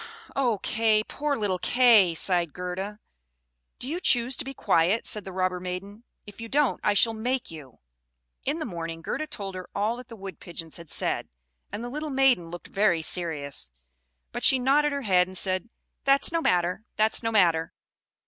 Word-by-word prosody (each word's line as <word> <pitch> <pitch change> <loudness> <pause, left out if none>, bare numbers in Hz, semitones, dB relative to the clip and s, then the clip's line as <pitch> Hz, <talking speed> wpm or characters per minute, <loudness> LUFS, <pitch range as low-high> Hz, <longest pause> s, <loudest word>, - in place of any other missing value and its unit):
"Oh, 245 -6 +1
Kay! 220 -1 +2
Poor 290 +4 -2
little 195 -4 -1
Kay!" 220 -5 +5
sighed 175 -2 +2
Gerda. 185 +3 -5 0.8
"Do 250 - -6
you 330 +5 -2
choose 245 -6 +2
to - - -1
be 270 - -6
quiet?" 180 +5 +2
said 210 -2 -1
the 190 - -6
robber 185 -1 -1
maiden. 195 +5 -7 0.2
"If 205 +2 -12
you 230 - -7
don't, 290 0 +1
I 210 - +2
shall 225 +3 +4
make 245 +2 -2
you." 145 -6 -11 0.7
In 285 +4 -1
the 315 - -4
morning 165 - -6
Gerda 310 - -3
told 200 -9 -5
her 185 -1 -8
all 215 +4 0
that 250 - -10
the 230 - -10
Wood 195 -5 -9
pigeons 165 -2 -5
had 170 -3 -12
said; - - -2 0.4
and 220 - -5
the 240 - -4
little 300 +2 -4
maiden 265 -11 +3
looked 175 +1 -8
very 195 -5 +2
serious, 145 - -2 0.6
but - - -5
she 265 - +6
nodded 285 +4 +3
her 280 -1 -3
head, 180 -4 +3
and 185 0 -6
said, 185 +4 -1 0.3
"That's 275 +2 +4
no 330 0 0
matter 180 - +1
that's 215 +1 +2
no 225 -1 -1
matter. 170 -6 +3
205 Hz, 185 wpm, -26 LUFS, 180-245 Hz, 0.8 s, she